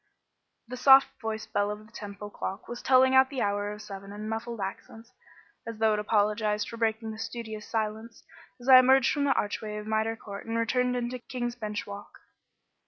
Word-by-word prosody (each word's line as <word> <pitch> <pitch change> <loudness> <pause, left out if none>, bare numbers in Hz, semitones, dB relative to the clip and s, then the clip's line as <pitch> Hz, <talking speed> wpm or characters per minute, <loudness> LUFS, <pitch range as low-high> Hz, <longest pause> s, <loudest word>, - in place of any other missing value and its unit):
The 250 +2 -7
soft 270 +1 +7
voiced 220 -1 -5
bell 205 0 +1
of 210 +1 -6
the 220 - -20
Temple 205 0 -8
clock 195 0 -6
was 240 0 -7
telling 260 0 +5
out 265 0 +6
the 270 -2 -2
hour 205 0 -1
of 210 +1 -8
seven 195 -1 -9
in 210 +1 -7
muffled 225 +1 -4
accents 225 +4 -7 0.5
(as 230 -1 -6
though 220 0 +3
it 210 - 0
apologised 210 0 +1
for 230 - -8
breaking 225 0 -1
the 215 - -9
studious 220 -2 -6
silence) 220 +1 -3 0.4
as 245 - -12
I 260 -1 +10
emerged 265 +1 +5
from 285 -1 0
the 275 - +3
archway 210 +1 -3
of 210 - -6
Mitre 220 +1 0
Court 200 0 -9
and 230 0 -1
turned 250 0 +1
into 245 +1 -3
King's 240 -1 -4
Bench 210 -3 -4
Walk. 205 0 -10
220 Hz, 195 wpm, -28 LUFS, 210-240 Hz, 0.5 s, I